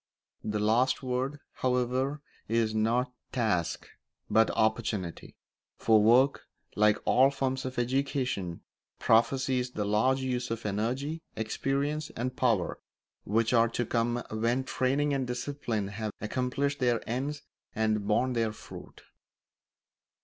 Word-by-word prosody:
The 105 0 -2
last 120 +6 +2
word, 130 +3 -2 0.2
however, 130 +3 0 0.3
is 115 -1 +1
not 120 +3 +1 0.2
task 105 -9 0 0.4
but 110 0 +5
opportunity; 110 -5 -1 0.4
for 110 -2 +4
work, 125 +6 +4 0.3
like 105 0 +4
all 130 +2 +5
forms 135 -1 -2
of 130 -1 -5
education, 125 - -1 0.4
prophesies 125 +2 +2
the 105 -4 -3
larger 130 +6 +2
uses 125 -1 -2
of 115 0 -4
energy, 125 +10 -2
experience, 140 +7 -1
and 125 +2 -3
power 115 -9 +1 0.5
which 110 +3 +1
are 115 -1 +5
to 120 +1 -1
come 120 +1 0
when 115 +4 0
training 135 +3 0
and 135 -2 -1
discipline 120 -5 -3
have 105 +1 -4
accomplished 130 +6 -1
their 120 -3 +1
ends 140 +5 -3 0.3
and 110 -2 0
borne 125 +4 +2
their 115 -2 +1
fruit. - - -12
120 Hz, 120 wpm, -29 LUFS, 110-130 Hz, 0.5 s, but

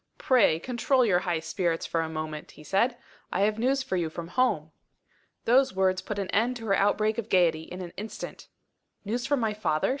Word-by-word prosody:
"Pray 245 -11 +4
control 250 +6 +1
your 180 -5 +3
high 175 -2 -1
spirits 165 +1 -1
for 165 - 0
a 160 - -3
moment," 155 -1 -5
he 150 - -12
said. 235 +9 +1 0.3
"I 190 - 0
have 210 +2 +2
news 265 +3 +1
for 190 -8 -2
you 170 -2 -1
from 165 +1 -7
home." 170 -9 +1 0.7
Those 255 -3 +4
words 185 -1 +2
put 205 +2 -5
an 195 -2 -3
end 240 +4 +1
to 225 - -8
her 195 -2 +3
outbreak 215 +2 +2
of 225 -1 -5
gaiety, 170 -4 +3
in 180 +1 -8
an 175 -2 -7
instant. 215 +1 -7 0.6
"News 235 +4 -2
from 285 -1 +2
my 220 -2 0
father?" 155 -7 0
195 Hz, 205 wpm, -27 LUFS, 170-235 Hz, 0.7 s, Pray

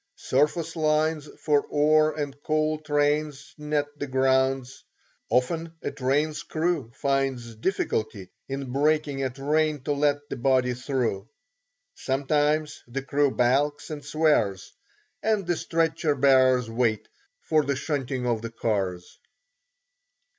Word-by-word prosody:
Surface 155 +5 0
lines 155 -1 +1
for 145 -2 +2
ore 155 +1 +3
and 145 -2 -3
coal 155 0 0
trains 145 -1 -1
net 150 -1 0
the 145 - -3
grounds. 130 0 +1 0.5
Often 160 +6 0
a - - -2
train's 145 +3 0
crew 160 -6 -1
finds 135 -5 -1
difficulty 110 - -2 0.2
in 135 -1 -4
breaking 145 -1 +1
a 135 - 0
train 150 +2 0
to 145 - -2
let 145 0 0
the - - -5
body 130 0 +2
through; 120 -6 -2 0.6
sometimes 150 +3 0
the 135 +3 -4
crew 140 +1 +2
balks 135 +5 +1
and 150 -1 -6
swears, 105 - +1 0.5
and 215 -3 +1
the 175 0 +1
stretcher 160 -2 0
bearers 130 -2 +4
wait 115 -2 0 0.3
for 155 -1 +1
the 140 0 -1
shunting 135 -3 -2
of 115 -2 0
the 115 - -5
cars. 95 -6 -3
140 Hz, 125 wpm, -26 LUFS, 130-155 Hz, 0.6 s, bearers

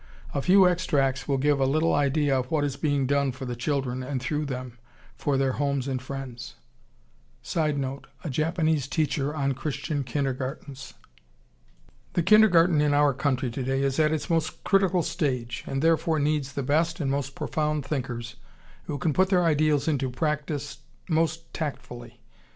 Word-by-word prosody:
A 140 - 0
few 185 +4 +6
extracts 140 -7 +1
will 140 -2 +1
give 145 +1 +2
a 135 - +3
little 155 +4 +2
idea 145 0 +2
of 125 0 -4
what 155 -2 +1
is 140 -2 -1
being 145 -1 0
done 140 0 +1
for 130 +1 -7
the 125 -1 -4
children 130 0 -2
and 130 +1 -3
through 150 +4 -2
them 125 -3 -6 0.4
for 140 -2 0
their 135 -1 +2
homes 140 -1 -1
and 130 -2 -2
friends. 130 -3 -7 0.9
[Sidenote: 140 -4 -2 0.2
A 160 - -4
Japanese 155 -1 0
teacher 150 -1 -1
on 140 -2 0
Christian 145 +1 -3
kindergartens.] 135 +1 -4 1.2
The 175 - +1
kindergarten 180 -6 +5
in 145 -1 +2
our 145 -1 +4
country 130 -2 -1
today 135 +2 -1
is 135 +2 0
at 155 -1 +4
its 155 -1 -2
most 165 -2 -1
critical 190 -3 +3
stage, 125 -9 -2
and 135 +2 -2
therefore 165 0 +2
needs 145 -2 0
the 140 - -3
best 165 +5 +1
and 140 -4 0
most 135 -1 -2
profound 150 -2 -1
thinkers 125 -4 -4 0.5
who 145 - -3
can 155 0 0
put 185 +3 +3
their 180 -2 +3
ideals 155 -2 +2
into 140 -4 0
practice 145 +1 -3 0.3
most 165 0 0
tactfully. 120 -6 -6
145 Hz, 160 wpm, -26 LUFS, 135-155 Hz, 1.2 s, few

